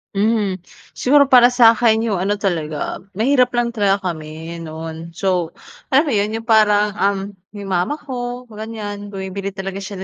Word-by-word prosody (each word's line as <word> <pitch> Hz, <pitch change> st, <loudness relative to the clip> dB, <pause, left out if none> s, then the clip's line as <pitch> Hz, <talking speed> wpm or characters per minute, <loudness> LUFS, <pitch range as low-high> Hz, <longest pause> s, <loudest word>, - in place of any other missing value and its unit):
Mhm, 205 Hz, -2 st, +1 dB, 0.3 s
siguro 285 Hz, +3 st, +4 dB
para 245 Hz, -1 st, +8 dB
sa'kin 230 Hz, -2 st, +4 dB
yung 210 Hz, -5 st, -1 dB
ano 200 Hz, +3 st, 0 dB
talaga, 165 Hz, -7 st, -3 dB, 0.2 s
mahirap 250 Hz, +4 st, +3 dB
lang 240 Hz, -1 st, +1 dB
talaga 200 Hz, -4 st, +1 dB
kami 160 Hz, +1 st, -8 dB
noon. 160 Hz, +1 st, -8 dB
So, 180 Hz, -3 st, -1 dB, 0.3 s
alam 270 Hz, +3 st, +4 dB
mo 300 Hz, -, -2 dB
yun, 210 Hz, 0 st, 0 dB
yung 225 Hz, -, -5 dB
parang, 210 Hz, -2 st, +4 dB
um, 200 Hz, 0 st, +2 dB, 0.4 s
yung 200 Hz, -1 st, -6 dB
mama 180 Hz, +10 st, 0 dB
ko 250 Hz, -4 st, -6 dB
ganyan 210 Hz, -1 st, -6 dB
bumibili 195 Hz, 0 st, -5 dB
talaga 195 Hz, 0 st, -5 dB
siya 195 Hz, -1 st, -7 dB
205 Hz, 155 wpm, -19 LUFS, 185-230 Hz, 0.4 s, para